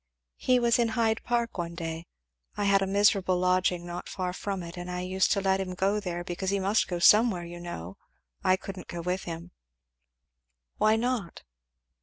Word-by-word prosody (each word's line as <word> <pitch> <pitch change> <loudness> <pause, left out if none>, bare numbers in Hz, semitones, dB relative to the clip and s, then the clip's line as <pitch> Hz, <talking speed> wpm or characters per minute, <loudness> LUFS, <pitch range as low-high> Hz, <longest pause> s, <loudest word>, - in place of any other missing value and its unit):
"He 255 -1 +3
was 235 -1 +3
in 235 - +3
Hyde 225 -1 +2
Park 235 -4 -1
one 170 0 -3
day 165 0 -5 0.5
I 205 - 0
had 200 -1 +4
a 195 - 0
miserable 195 -2 +3
lodging 180 -1 +1
not 175 0 -6
far 180 -2 -3
from 195 -1 -4
it, 170 +1 -8
and 175 0 -6
I 180 0 -3
used 185 +1 +1
to 200 - 0
let 190 0 +2
him 185 -1 -4
go 195 +2 +1
in - - -2
there, 175 -3 -4
because 180 +2 -3
he 200 0 +1
must 200 +3 +2
go 175 - -2
somewhere, 210 0 +5
you 175 0 -8
know, 95 - -7 0.5
I 185 - +4
couldn't 190 -1 -8
go 175 - -5
with 180 +2 -2
him 170 +1 -7 0.6
" - - -54
"Why 215 0 +4
not?" 230 -5 -2
185 Hz, 200 wpm, -28 LUFS, 175-200 Hz, 0.6 s, somewhere